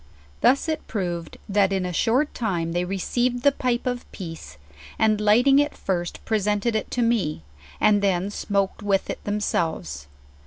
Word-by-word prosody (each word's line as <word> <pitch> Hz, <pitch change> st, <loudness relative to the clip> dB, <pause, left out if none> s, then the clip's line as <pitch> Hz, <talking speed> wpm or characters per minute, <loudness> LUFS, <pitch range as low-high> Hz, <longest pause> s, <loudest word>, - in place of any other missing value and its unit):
"Thus 275 Hz, +5 st, +4 dB
it 315 Hz, -1 st, -3 dB
proved 175 Hz, -6 st, -3 dB
that 200 Hz, -1 st, +2 dB
in 190 Hz, -2 st, 0 dB
a 180 Hz, -, -3 dB
short 255 Hz, -, +1 dB
time 175 Hz, -8 st, -1 dB
they 175 Hz, +1 st, 0 dB
received 240 Hz, +6 st, -1 dB
the 285 Hz, -, +6 dB
pipe 250 Hz, -3 st, -1 dB
of 245 Hz, -1 st, -3 dB
peace, 165 Hz, -, -8 dB, 0.4 s
and 215 Hz, -1 st, +2 dB
lighting 245 Hz, +7 st, +5 dB
it 290 Hz, 0 st, 0 dB
first 175 Hz, -2 st, -3 dB
presented 210 Hz, +1 st, 0 dB
it 215 Hz, -, -1 dB
to 245 Hz, -, 0 dB
me, 205 Hz, -, 0 dB, 0.4 s
and 210 Hz, -1 st, +4 dB
then 195 Hz, 0 st, +1 dB
smoked 200 Hz, -1 st, -1 dB
with 200 Hz, -2 st, 0 dB
it -, -, -8 dB
themselves. 160 Hz, -, -2 dB
205 Hz, 160 wpm, -24 LUFS, 180-240 Hz, 0.4 s, the